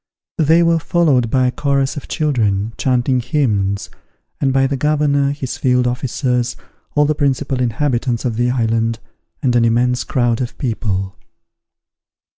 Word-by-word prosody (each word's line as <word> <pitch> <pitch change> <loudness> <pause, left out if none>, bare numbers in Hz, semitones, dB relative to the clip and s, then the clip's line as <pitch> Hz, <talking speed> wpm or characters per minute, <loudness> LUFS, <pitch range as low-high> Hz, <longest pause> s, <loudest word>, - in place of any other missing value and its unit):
They 160 +2 +4
were 165 0 +3
followed 150 -9 +2
by 130 +2 +2
a 125 - +2
chorus 140 +1 0
of 145 - -7
children, 110 -8 0
chanting 130 0 +1
hymns, 110 -8 -1 0.5
and 135 -2 +1
by 135 0 +3
the 140 +1 -1
governor, 145 0 +1
his 140 -3 -5
field 125 -1 +2
officers, 125 0 -1 0.4
all 150 0 +4
the 155 - +1
principal 140 -2 -1
inhabitants 120 0 -1
of 120 -3 -1
the 120 +2 +1
island, 115 -2 0 0.5
and 125 -3 +2
an 120 - +4
immense 125 +2 +2
crowd 120 -3 0
of 120 - -5
people. 100 -6 -2
125 Hz, 145 wpm, -18 LUFS, 120-140 Hz, 0.5 s, They